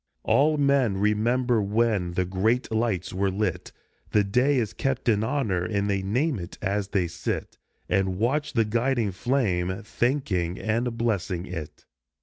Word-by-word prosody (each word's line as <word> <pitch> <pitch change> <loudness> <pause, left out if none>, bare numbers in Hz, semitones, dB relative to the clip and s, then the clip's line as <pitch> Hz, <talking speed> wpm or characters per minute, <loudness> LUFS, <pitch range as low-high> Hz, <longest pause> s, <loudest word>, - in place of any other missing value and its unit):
All 150 +2 +3
men 140 -8 +2
remember 115 +4 +2
when 105 -3 +1
the 90 +1 0
great 110 +8 0
lights 110 -6 -1
were 95 +1 +1
lit, 95 -1 -2 0.4
The 105 - +5
day 125 +8 +2
is 110 -7 -1
kept 130 +7 -2
in 110 -2 +3
honor, 110 -9 0
and 100 +1 -1
they 100 -1 0
name 125 +7 0
it 85 +1 -8
as 100 0 -1
they 95 -3 0
sit 85 - -4 0.3
And 95 -1 +1
watch 145 +8 0
the 115 -2 +3
guiding 115 0 0
flame, 95 -4 0
thanking 105 -8 -1
and 115 +2 -1
blessing 100 -6 -1
it. 80 -5 -7
105 Hz, 150 wpm, -26 LUFS, 95-125 Hz, 0.4 s, The